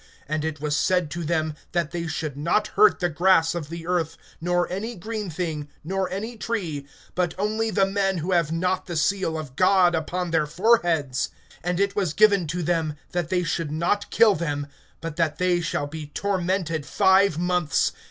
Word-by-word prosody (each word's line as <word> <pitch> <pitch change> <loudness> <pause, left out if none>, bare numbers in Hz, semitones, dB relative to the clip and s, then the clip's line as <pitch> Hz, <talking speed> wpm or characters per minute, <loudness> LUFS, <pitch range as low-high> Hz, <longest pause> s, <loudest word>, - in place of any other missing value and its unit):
(4)And 155 +1 -1
it 160 -2 -3
was 150 0 -1
said 180 -1 +1
to 170 0 -4
them, 155 -1 0 0.2
that 170 -3 0
they 170 -1 -3
should 155 -3 -3
not 170 +9 +1
hurt 215 -1 +5
the 175 - +2
grass 170 0 +3
of 165 -4 -5
the 165 0 -7
earth, 170 -2 -1 0.2
nor 175 +1 +1
any 220 +6 -3
green 215 +1 -5
thing, 155 -3 -4
nor 190 +3 -1
any 220 +5 -4
tree, 170 -12 -3 0.3
but 180 -2 0
only 215 +3 0
the 200 -2 +3
men 195 -1 0
who 170 +3 -2
have 170 -4 +2
not 180 +3 0
the 175 - -4
seal 165 0 +1
of 145 -5 -7
God 185 +1 +4
upon 175 +2 -2
their 155 -2 +2
foreheads. 165 - +2 0.3
(5)And 175 +1 -1
it 200 0 +1
was 185 -7 0
given 200 -3 +4
to 170 +3 -2
them, 160 -2 0 0.2
that 175 -2 -2
they 180 -1 +1
should 165 -3 -2
not 170 +6 0
kill 225 -3 +5
them, 145 -5 -2 0.4
but 165 -1 -5
that 160 -2 +1
they 180 -1 +2
shall 160 -3 -1
be 150 +1 -7
tormented 180 -2 -1
five 190 +3 +4
months. 175 -4 +1
175 Hz, 190 wpm, -24 LUFS, 155-190 Hz, 0.4 s, hurt